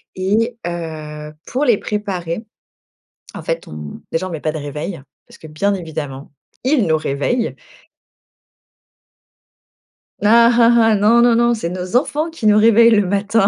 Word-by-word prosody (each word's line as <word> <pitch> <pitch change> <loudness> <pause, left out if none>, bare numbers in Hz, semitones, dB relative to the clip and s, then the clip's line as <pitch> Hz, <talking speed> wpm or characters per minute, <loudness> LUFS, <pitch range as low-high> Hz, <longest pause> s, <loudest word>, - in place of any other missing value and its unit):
et 220 +6 0
heu, 155 -3 -6 0.2
pour 275 +4 -1
les 235 -5 +4
préparer, 200 -2 -4 0.9
en - - -7
fait, - - -4
on 75 -1 -9
déjà, 175 +3 -1
on - - -9
met 160 -3 -5
pas 155 - -2
de 155 - -5
réveil, 150 +3 -6 0.3
parce - - -17
que, 160 - -12
bien 200 +7 -1
évidemment, 150 -6 -6 0.3
ils 260 - +2
nous 160 -1 +2
réveillent. 155 - -2 2.7
Ah 230 +3 +6
ah 235 0 +4 0.2
ah, - - +3
non, 220 +4 +4
non, 240 -1 +4
non, 235 0 +3
c'est 190 -7 -3
nos 185 +4 -5
enfants 300 +5 0
qui 320 -9 -7
nous 210 0 +5
réveillent 230 +1 +6
le 205 -4 +3
matin. 200 +1 +1
200 Hz, 155 wpm, -18 LUFS, 160-230 Hz, 2.7 s, Ah